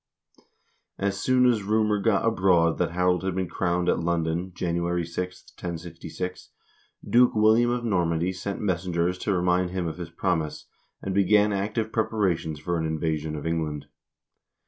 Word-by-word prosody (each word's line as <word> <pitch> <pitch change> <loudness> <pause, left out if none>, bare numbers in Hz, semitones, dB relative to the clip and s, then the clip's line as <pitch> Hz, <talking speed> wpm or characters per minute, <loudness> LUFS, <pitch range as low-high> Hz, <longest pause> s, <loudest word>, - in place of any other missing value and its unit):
As 100 0 -1
soon 130 +2 +3
as 120 -4 +3
rumor 105 +1 +1
got 110 +1 +2
abroad 90 -6 +3
that 90 - +1
Harold 90 +1 +1
had 95 -1 -2
been 95 -1 -1
crowned 90 0 -1
at - - +2
London, 85 +1 -1
January 85 0 -1
6, 90 +2 -5
1066, 85 +1 -6 0.6
Duke 125 0 +4
William 110 +3 +4
of 120 0 -1
Normandy 90 -3 +1
sent 100 +2 -5
messen 90 -3 -1
gers 90 +2 +1
to 105 - -1
remind 90 0 +2
him 90 -1 -3
of 80 +1 -4
his 85 -2 -5
promise, 85 -2 -2 0.4
and 95 - -2
began 105 +2 +4
active 110 +3 -2
preparations 95 -9 0
for 85 +2 -2
an 80 - -1
invasion 80 -1 -2
of 75 - -6
England. 80 -3 -2
90 Hz, 155 wpm, -26 LUFS, 85-100 Hz, 0.6 s, Duke